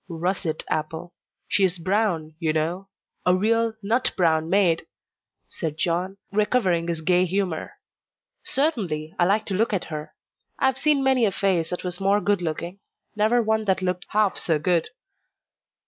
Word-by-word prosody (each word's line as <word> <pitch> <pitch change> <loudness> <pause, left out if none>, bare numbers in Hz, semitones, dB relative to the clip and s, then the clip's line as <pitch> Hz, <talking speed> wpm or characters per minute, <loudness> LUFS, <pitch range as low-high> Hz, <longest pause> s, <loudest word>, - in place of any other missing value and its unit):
"Russet 170 -1 -2
apple. 160 +3 -3 0.3
She 200 - +2
is 185 -1 +2
brown, 180 -3 0
you 160 -3 0
know 170 +5 -2 0.3
a 180 - +4
real 225 +3 +1
'nut 230 +5 +1
brown 160 -3 +2
mayde,'" 180 -3 +2 0.6
said 155 -2 -5
John, 180 +4 -1
recovering 200 -5 +1
his 165 -2 -2
gay 180 +2 +3
humour. 185 -2 -2 0.7
"Certainly, 190 - -1
I 175 - +5
like 205 +4 +2
to 195 - -3
look 215 +3 +1
at 190 - 0
her. 150 0 -6 0.4
I - - +1
have 265 0 +2
seen 290 -1 +3
many 265 -2 +3
a 200 - +1
face 185 -5 +1
that 180 - -4
was 180 0 -1
more 200 +1 +3
good 205 -2 +1
looking 170 +3 -4 0.4
never 220 +3 +3
one 220 0 0
that 190 -1 +1
looked 180 -1 -2
half 210 -2 +2
so 165 -3 +1
good." 165 +2 +1
185 Hz, 165 wpm, -24 LUFS, 165-210 Hz, 0.7 s, I